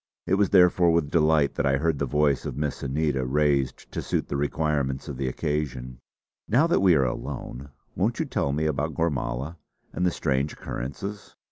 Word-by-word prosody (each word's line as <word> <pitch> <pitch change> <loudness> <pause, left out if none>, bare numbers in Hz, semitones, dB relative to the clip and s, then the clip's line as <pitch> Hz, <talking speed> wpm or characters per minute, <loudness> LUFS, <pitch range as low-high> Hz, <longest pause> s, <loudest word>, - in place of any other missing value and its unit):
It - - -1
was 100 0 +3
therefore, 90 -2 +5
with 80 -3 +1
delight 75 -3 +3
that 70 - -1
I 70 0 +3
heard 80 0 0
the 70 - 0
voice 75 0 +2
of - - -5
Miss 75 -1 -2
Anita, 70 0 0
raised 70 0 0
to - - -3
suit - - -2
the - - -2
requirements 70 -2 -1
of 70 - -5
the 65 - -2
occasion: 65 -3 -3 0.5
"Now 130 +9 +4
that 170 - +2
we 95 -3 +5
are 70 -3 +3
alone, 65 +2 -5 0.3
won't - - 0
you - - +1
tell 70 - -1
me 75 +3 -1
about 75 0 -1
Gormala 75 -1 -2 0.4
and 90 - -2
the 90 - +4
strange 70 -3 -1
occurrences?" 100 +11 -6
75 Hz, 190 wpm, -26 LUFS, 70-80 Hz, 0.5 s, therefore